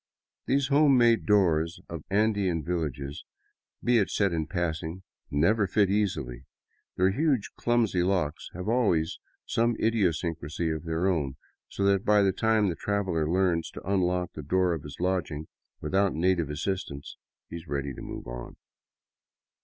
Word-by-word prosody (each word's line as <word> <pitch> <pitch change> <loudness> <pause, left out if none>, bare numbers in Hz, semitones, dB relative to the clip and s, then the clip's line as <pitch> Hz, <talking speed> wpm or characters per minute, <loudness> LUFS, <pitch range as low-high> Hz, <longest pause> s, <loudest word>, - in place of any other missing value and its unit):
These 135 0 +2
home 140 -1 +5
made 120 -1 +4
doors 85 -4 +3
of 85 -3 -7
Andean 100 -5 +1
villages, 75 -3 -3 0.6
be 120 -1 +4
it 100 - +1
said 100 -4 +1
in 80 -1 -1
passing, 85 0 -3 0.3
never 100 +8 +2
fit 100 +1 +2
easily; 75 -13 -1 0.5
their 95 +1 +4
huge 135 -3 +1
clumsy 115 -6 +1
locks 90 -5 -1
have 90 +2 -5
always 105 -9 +1 0.3
some 115 +1 +1
idiosyncrasy 85 -7 0
of 80 +1 -4
their 80 +2 -1
own, 75 -8 0 0.3
so 100 - -3
that 100 0 +3
by 105 -1 +4
the 95 - +3
time 110 0 +2
the 85 - -1
traveler 95 -7 -1
learns 90 -2 +1
to - - -10
unlock 90 -2 0
the 75 - -6
door 90 +4 +1
of 80 - -4
his 70 -1 -9
lodging 85 -4 -1 0.3
without 95 -1 +1
native 85 -2 +1
as 75 +1 -4
sistance, 90 -8 -4 0.3
he - - -7
is 85 0 -11
ready 70 -1 -3
to - - -9
move - - -7
on. - - -7
90 Hz, 155 wpm, -28 LUFS, 80-100 Hz, 0.6 s, home